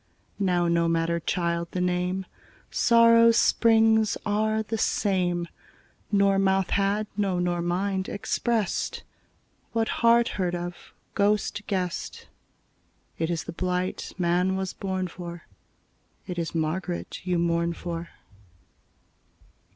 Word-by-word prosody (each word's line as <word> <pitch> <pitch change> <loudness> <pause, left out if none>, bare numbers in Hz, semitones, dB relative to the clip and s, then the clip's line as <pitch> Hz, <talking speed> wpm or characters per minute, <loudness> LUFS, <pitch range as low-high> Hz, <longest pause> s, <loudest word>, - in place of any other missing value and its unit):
Now 180 -3 +2
no 170 0 +2
matter, 165 0 +1
child, 170 0 -1
the 185 - -2
name: 180 +1 -1 0.5
Sórrow's 230 0 +5
spríngs 220 -2 +4
áre 215 +1 0
the 225 - -3
same. 180 -5 0 0.6
Nor 200 -1 +3
mouth 190 -1 +1
had, 200 +2 +1
no 195 -3 0
nor 175 -1 0
mind, 190 +2 -1
expressed 215 0 -1 0.7
What 225 -1 +1
heart 235 0 +5
heard 175 -1 0
of, 175 0 -4 0.4
ghost 205 0 +1
guessed: 180 -3 -3 0.9
It 165 0 0
is 170 -2 -2
the - - -7
blight 180 +1 -2
man 180 +1 +1
was 190 -1 -3
born 190 -1 -3
for, 175 -1 -8 0.8
It 180 -2 -4
is 170 0 -4
Margaret 170 +3 -3
you 180 -1 0
mourn 170 0 +1
for. 170 0 -6
185 Hz, 115 wpm, -26 LUFS, 175-205 Hz, 0.9 s, Sórrow's